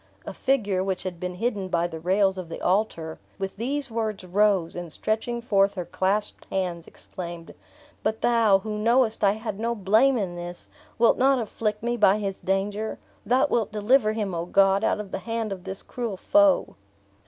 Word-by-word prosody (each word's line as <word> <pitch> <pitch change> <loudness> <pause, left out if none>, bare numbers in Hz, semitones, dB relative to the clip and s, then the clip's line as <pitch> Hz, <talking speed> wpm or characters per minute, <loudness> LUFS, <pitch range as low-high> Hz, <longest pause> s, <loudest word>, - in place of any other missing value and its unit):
A - - -6
figure, 205 -9 0
which 190 -1 -2
had 180 -2 -5
been 180 0 -4
hidden 205 -2 -2
by 170 -2 +1
the 165 -2 -5
rails 190 +2 +2
of 175 -3 -7
the 165 - -6
altar, 180 -5 -1 0.2
with 195 0 -4
these 270 +3 -2
words 220 -3 -2
rose, 190 -2 +2
and 175 -2 -6
stretching 230 +6 -2
forth 200 -3 +2
her 180 -2 -4
clasped 200 +4 -1
hands, 180 -3 -2
exclaimed, 170 -2 -8 0.5
"But 220 +1 -1
Thou, 230 -4 +4
who 210 +1 -5
knowest 230 0 +2
I 200 -1 +5
had 215 -2 -5
no 235 +1 -1
blame 220 +6 +3
in 185 -5 -2
this, 175 0 -7 0.3
wilt 230 0 +4
not 270 +1 +4
afflict 215 -2 -3
me 240 0 0
by 200 -2 +5
his 195 -2 -3
danger! 200 +3 -1 0.3
Thou 255 +2 +4
wilt 225 -4 +1
deliver 215 +1 +3
him, 210 -4 -2
O 170 0 -3
God, 195 +2 +4
out 220 - +1
of 210 -2 -7
the - - -3
hand 225 -2 -3
of 190 -2 -6
this 190 0 -6
cruel 235 -6 -4
foe!" 300 +6 +3
205 Hz, 190 wpm, -25 LUFS, 185-225 Hz, 0.5 s, I